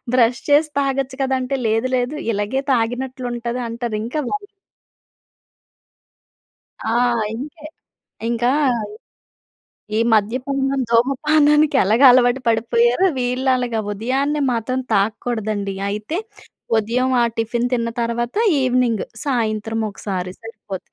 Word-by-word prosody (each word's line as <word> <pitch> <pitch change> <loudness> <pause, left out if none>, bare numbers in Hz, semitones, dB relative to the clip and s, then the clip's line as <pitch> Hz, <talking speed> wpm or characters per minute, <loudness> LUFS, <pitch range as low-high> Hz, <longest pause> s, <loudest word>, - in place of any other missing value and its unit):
Brush 240 -1 +3
చేసి 300 +2 +4
తాగొచ్చు 270 -1 -2
కదా! 265 0 +1
అంటే, 265 +2 -2
లేదు 225 +4 +1
లేదు 250 +4 -2 0.2
ఇలాగే 210 +6 -1
తాగినట్లు 250 +2 -2
ఉంటుంది 240 +1 -3
అంటారు. 230 -1 -3
ఇంకా 260 +7 -2
వా - - 0 2.5
ఆ! - - 0 0.4
ఇంకే 295 +5 -8 0.7
ఇంకా 240 +1 +1 1.5
ఈ - - +2
మద్యపానం, 270 +5 0
ధుమపానానికి 295 +4 +3
ఎలాగా 220 +8 +4
అలవాటు 245 +1 +3
పడిపోయారో 235 +6 +2
వీళ్ళు 250 +2 0
అలాగా 245 -3 -1
ఉదయాన్నే 265 +8 -1
మాత్రం 245 +3 -1
తాగకూడదండి. 210 -1 -1 0.2
అయితే 210 - -3 0.6
ఉదయం 240 +4 0
ఆ - - +4
టిఫిన్ 235 +2 -1
తిన్న 230 -1 0
తర్వాత 235 +1 -2 0.3
ఈవెనింగ్ 250 -4 +1 0.2
సాయంత్రం 225 -4 -1
ఒకసారి 190 -3 -4
సరిపోంది. 220 -4 -8
245 Hz, 105 wpm, -20 LUFS, 225-265 Hz, 2.5 s, చేసి